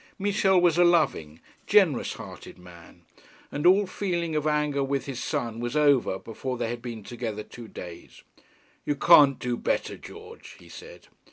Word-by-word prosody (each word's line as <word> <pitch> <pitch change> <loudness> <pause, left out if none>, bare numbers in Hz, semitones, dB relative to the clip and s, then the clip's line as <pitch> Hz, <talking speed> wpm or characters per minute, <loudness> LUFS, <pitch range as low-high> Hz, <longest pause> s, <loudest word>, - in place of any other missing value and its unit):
Michel 195 -2 +2
was 175 -1 +3
a - - +7
loving, 150 - +1 0.3
generous 190 - +3
hearted - - -11
man, 85 -1 -16 0.5
and 145 +4 0
all 195 +3 +5
feeling 175 -4 -3
of 150 0 0
anger 150 -2 0
with 135 0 -2
his 135 -3 -6
son 115 -1 -3
was 120 +3 -4
over 140 -9 +3
before 125 +5 -6
they 115 - -2
had 120 0 -5
been 115 -3 -7
together 115 -2 -5
two 120 +1 -12
days. 90 -5 -11 0.6
'You 145 - -1
can't 145 -3 +6
do 125 -1 -3
better, - - -2
George,' - - -12
he - - -17
said. - - -12
140 Hz, 165 wpm, -26 LUFS, 115-170 Hz, 0.6 s, a